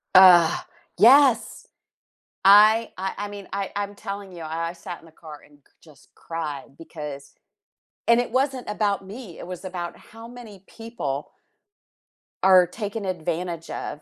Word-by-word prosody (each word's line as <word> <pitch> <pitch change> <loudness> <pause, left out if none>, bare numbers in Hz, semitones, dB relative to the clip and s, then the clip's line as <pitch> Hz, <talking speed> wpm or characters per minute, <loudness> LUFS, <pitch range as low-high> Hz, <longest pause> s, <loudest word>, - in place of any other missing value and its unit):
Ugh, 180 -3 +7 0.3
yes! 250 +2 +5 0.8
I 215 +3 +6
I 190 +1 -3
I 205 0 -4
mean, 205 -1 -10
I 195 0 -3
I'm 205 0 -3
telling 200 -1 -7
you, 170 -2 -9
I 165 +1 -3
I - - -6
sat 175 0 -9
in - - -18
the 165 - -18
car 155 -2 -12
and 145 -1 -24
cr - - -31
just 155 -4 -20
cried 150 -4 -6
because 150 -4 -9 0.8
and 235 0 +5
it 245 - -2
wasn't 260 -1 -1
about 205 -2 -1
me, 205 -3 -10
it - - -9
was 180 0 -8
about 175 -2 -6
how 225 +1 -13
many 230 -6 -12
people 225 - -6 1.1
are 185 -2 +6
taken 210 +3 -5
advantage 170 -2 -4
of. 150 - -6
190 Hz, 155 wpm, -24 LUFS, 165-215 Hz, 1.1 s, Ugh